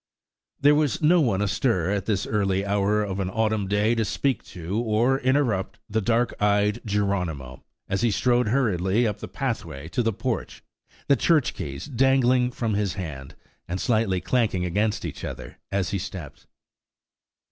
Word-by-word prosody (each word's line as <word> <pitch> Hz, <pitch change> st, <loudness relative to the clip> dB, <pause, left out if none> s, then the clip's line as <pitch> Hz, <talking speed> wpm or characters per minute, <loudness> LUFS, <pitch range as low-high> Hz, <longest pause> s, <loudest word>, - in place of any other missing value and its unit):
There 145 Hz, +1 st, +6 dB
was 150 Hz, +2 st, +1 dB
no 170 Hz, +3 st, +5 dB
one 105 Hz, -8 st, +1 dB
astir 105 Hz, -3 st, +1 dB
at 100 Hz, -1 st, -2 dB
this 100 Hz, -3 st, 0 dB
early 100 Hz, -2 st, 0 dB
hour 100 Hz, +1 st, +1 dB
of 100 Hz, -1 st, -3 dB
an 95 Hz, -1 st, -1 dB
autumn 110 Hz, -1 st, 0 dB
day 105 Hz, +3 st, +2 dB
to 115 Hz, -1 st, +1 dB
speak 135 Hz, +5 st, 0 dB
to 90 Hz, +5 st, -4 dB
or 120 Hz, +3 st, +2 dB
interrupt 130 Hz, -8 st, +1 dB
the 110 Hz, 0 st, 0 dB
dark 115 Hz, +3 st, +1 dB
eyed 105 Hz, +2 st, +2 dB
Geronimo, 90 Hz, -, -2 dB, 0.2 s
as 95 Hz, 0 st, -1 dB
he 120 Hz, -, +3 dB
strode 120 Hz, +3 st, +2 dB
hurriedly 110 Hz, -3 st, +1 dB
up 105 Hz, -3 st, -2 dB
the -, -, -6 dB
pathway 70 Hz, +3 st, -4 dB
to 125 Hz, -, 0 dB
the 115 Hz, -1 st, +1 dB
porch, 115 Hz, +3 st, -4 dB, 0.4 s
the 140 Hz, -, +5 dB
church 150 Hz, 0 st, +2 dB
keys 70 Hz, -1 st, -6 dB
dangling 130 Hz, -2 st, +3 dB
from 115 Hz, -3 st, -2 dB
his 100 Hz, -2 st, -1 dB
hand, 75 Hz, -8 st, -7 dB, 0.3 s
and 90 Hz, +2 st, -3 dB
slightly 110 Hz, -6 st, +1 dB
clanking 105 Hz, -3 st, 0 dB
against 105 Hz, +4 st, 0 dB
each -, -, -6 dB
other -, -, -7 dB
as 95 Hz, -4 st, 0 dB
he 100 Hz, -, -1 dB
stepped. 85 Hz, -5 st, -8 dB
105 Hz, 165 wpm, -25 LUFS, 95-120 Hz, 0.4 s, There